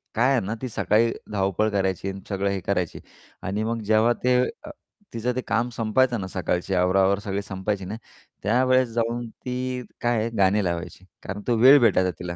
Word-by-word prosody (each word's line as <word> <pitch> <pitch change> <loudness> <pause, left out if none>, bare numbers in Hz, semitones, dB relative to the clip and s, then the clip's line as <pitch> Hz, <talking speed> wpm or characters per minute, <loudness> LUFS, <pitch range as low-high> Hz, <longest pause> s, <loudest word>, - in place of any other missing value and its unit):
काय 125 +4 +3
आहे 130 - +3
ना, 110 +3 -3
ती 130 - -3
सकाळी 115 +2 +2 0.2
धावपळ 100 +1 +1
करायची 95 -2 -1
आणि 95 0 -7
सगळं 100 0 -1
हे 100 0 -1
करायची. 90 -3 -2 0.4
आणि 100 +3 -2
मग 115 0 -2
जेव्हा 110 +3 +4
ते 125 0 +4 0.3
अ, 305 - -9 0.4
तिचं 120 +2 -2
ते 130 - -1
काम 115 +4 +1
संपायचं 115 +1 +1
ना, 95 - -4
सकाळची 90 0 -2
आवरावावर 95 +2 +3
सगळी 100 -1 -3
संपायची 95 0 -3
ना, 100 - -5 0.5
त्यावेळेस 130 +3 +3
जाऊन 120 +1 -1
ती 125 +2 -4 0.2
काय 120 -1 +1
आहे 115 - -1
गाणे 100 +1 +3
लावायची. 85 +1 -4 0.2
कारण 100 +2 -5
तो 120 - +3
वेळ 130 +5 +8
भेटायचा 95 -6 +3
तिला. 85 -1 -5
105 Hz, 185 wpm, -24 LUFS, 95-120 Hz, 0.5 s, वेळ